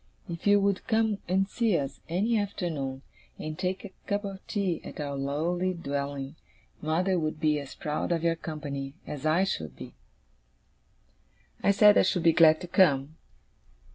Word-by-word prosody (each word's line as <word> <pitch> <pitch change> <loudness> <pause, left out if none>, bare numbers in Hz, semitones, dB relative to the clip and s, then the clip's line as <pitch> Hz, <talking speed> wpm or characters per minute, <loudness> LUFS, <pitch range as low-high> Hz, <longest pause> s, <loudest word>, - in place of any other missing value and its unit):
If 170 +2 -5
you 205 0 +6
would 200 -1 0
come 220 -2 +2
and 190 +2 +2
see 220 -3 +1
us, 135 -1 -4
any 205 +8 +1
afternoon, 155 -10 -3 0.3
and 155 0 -5
take 185 +3 -2
a 200 - -9 0.2
cup 205 +1 -1
of 195 -1 -6
tea 195 -6 -1
at - - -9
our 145 -1 -3
lowly 165 +7 -1
dwelling, 140 -2 -4 0.4
mother 175 +4 +1
would 155 -1 -2
be 155 -2 +2
as 140 -2 -9
proud 150 +3 -2
of 170 -1 0
your 165 0 +2
company 145 -4 -5
as 150 +1 -4
I 165 +5 +3
should 80 - -3
be.' - - -10 1.7
I - - +2
said 205 +1 +7
I - - +7
should 180 -4 +1
be 165 -2 +5
glad 160 -1 +6
to 180 - -6
come. 155 -5 +3
165 Hz, 170 wpm, -28 LUFS, 150-195 Hz, 1.7 s, said